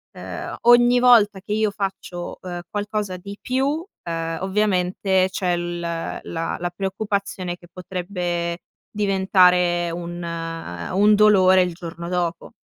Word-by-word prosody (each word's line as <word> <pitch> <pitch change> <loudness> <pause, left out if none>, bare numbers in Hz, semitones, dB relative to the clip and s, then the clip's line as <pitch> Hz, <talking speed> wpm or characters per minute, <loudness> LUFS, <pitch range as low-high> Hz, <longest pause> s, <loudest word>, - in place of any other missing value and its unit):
ehm, - - -6
ogni 240 +1 +6
volta 230 -5 +5
che 205 - -4
io 215 -1 +1
faccio, 195 -3 -5
ehm, 175 -1 -6
qualcosa 205 -2 -3
di 200 +3 -9
più, 275 +5 0 0.2
ehm, 165 -1 -3
ovviamente 190 -1 +1
c'è 180 -2 0
l 175 0 -4
la 165 0 -4
la 175 - -2
preoccupazione 195 -2 -3
che 175 - -17
potrebbe 175 -2 -3 0.4
diventare 180 -3 +3
un 175 +1 -6 0.7
un 205 +3 +5
dolore 190 -3 +6
il 180 -1 -3
giorno 170 0 -7
dopo. 175 0 -2
185 Hz, 125 wpm, -22 LUFS, 175-205 Hz, 0.7 s, ogni